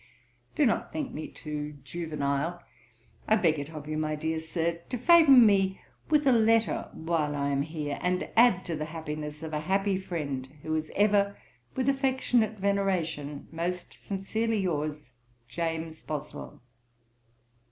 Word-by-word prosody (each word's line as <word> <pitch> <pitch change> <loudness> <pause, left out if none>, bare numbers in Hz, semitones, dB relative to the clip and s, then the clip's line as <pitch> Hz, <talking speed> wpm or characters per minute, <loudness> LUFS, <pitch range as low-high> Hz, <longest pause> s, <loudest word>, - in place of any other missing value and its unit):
Do 300 - +4
not 230 - 0
think 290 -5 -3
me 155 - -5
too 150 -1 -6
juvenile. 150 +2 -2 0.6
I 215 - +5
beg 165 -7 +2
it 140 +1 -5
of 155 -2 -8
you, 155 0 -2
my 155 0 -1
dear 160 +1 -2
Sir, 165 +1 -2
to 250 - -2
favour 325 +5 +6
me 200 -7 +6 0.3
with 300 -1 +3
a 265 - +6
letter 225 -1 +3
while 160 -3 -1
I 140 0 0
am 140 0 +1
here, 150 -1 -4
and 180 0 0
add 230 -5 +5
to 170 - -2
the 155 0 -3
happiness 155 -1 -6
of 160 -1 -6
a 150 - 0
happy 195 +3 +1
friend, 145 -8 -4
who 155 - -2
is 155 0 -2
ever, 200 -1 +3 0.4
with 260 0 0
affectionate 260 -5 +1
veneration, 180 -8 -1
'Most 175 +2 -3
sincerely 220 +3 -2
yours, 150 -7 -2 0.3
'James 160 +4 -3
Boswell.' 150 -4 -7
165 Hz, 150 wpm, -28 LUFS, 150-205 Hz, 0.6 s, favour